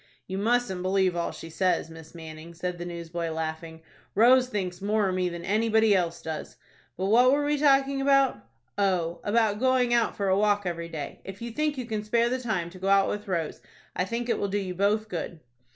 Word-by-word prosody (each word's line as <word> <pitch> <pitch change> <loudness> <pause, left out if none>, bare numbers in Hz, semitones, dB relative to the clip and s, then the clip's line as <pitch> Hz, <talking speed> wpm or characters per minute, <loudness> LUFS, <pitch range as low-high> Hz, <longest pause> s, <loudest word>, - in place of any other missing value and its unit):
"You 190 +1 -4
mustn't 220 -4 +1
believe 185 -1 +1
all 170 0 -1
she 165 - -10
says, 180 -2 0
Miss 160 0 -12
Manning," 160 0 -10
said 180 +1 -4
the 175 - -5
newsboy, 170 -1 -4
laughing. 160 0 -5 0.3
"Rose 250 +4 +6
thinks 185 -6 -4
more 210 0 +1
of 185 - -1
me 185 -1 0
than 170 0 -7
anybody 220 +1 +3
else 170 -2 -1
does. 160 -1 -6 0.4
But 185 - -2
what 240 +5 +5
were 290 +1 +2
we 295 0 +1
talking 275 -1 +3
about? 275 -1 +3 0.4
Oh, 175 -4 +1
about 210 -1 +2
going 255 -1 +2
out 235 -1 +2
for 200 - -1
a 190 - +3
walk 205 0 +2
every 170 -1 -3
day. 155 -4 -6
If 195 +1 -9
you 235 0 -5
think 300 +3 -1
you 255 - -3
can 215 -2 -3
spare 235 +2 +2
the 255 +1 -1
time 195 -9 -2
to 185 - -12
go 190 - -3
out 195 0 +4
with 210 0 -4
Rose, 170 -5 -2 0.3
I 180 - 0
think 235 +4 -3
it 235 - 0
will 200 - 0
do 200 +1 -1
you 190 -3 -3
both 205 +4 +1
good." 170 -3 -5
195 Hz, 215 wpm, -27 LUFS, 170-230 Hz, 0.4 s, Rose